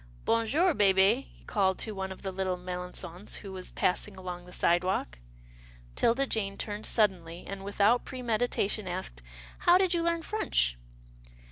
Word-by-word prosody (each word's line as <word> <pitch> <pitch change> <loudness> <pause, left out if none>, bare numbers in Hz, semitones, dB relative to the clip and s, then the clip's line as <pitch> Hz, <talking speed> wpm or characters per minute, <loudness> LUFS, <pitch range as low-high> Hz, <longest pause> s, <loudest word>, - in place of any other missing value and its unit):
Bon 230 0 +2
jour, 335 +8 +3
hehe," 200 +3 +4
he - - -22
called 190 -3 +1
to 220 - -3
one 190 -2 -4
of 190 - -9
the 190 - -3
little 185 -1 -1
Melangons 180 +1 -3
who 195 - -8
was 185 -1 -4
passing 180 - -1
along 180 -1 -6
the - - -12
sidewalk. 175 - +1 0.8
'Tilda 250 +4 +3
Jane 200 -6 -2
turned 210 0 -4
suddenly, 180 -6 +1
and, 195 0 -6
without 205 +4 +3
pre 255 -1 -7
meditation, 215 -3 0
asked, 175 - -4 0.4
"How 350 +1 +6
did 375 -1 +2
you 340 - +1
learn 335 0 0
French?" 410 - +1
195 Hz, 160 wpm, -29 LUFS, 185-230 Hz, 0.8 s, How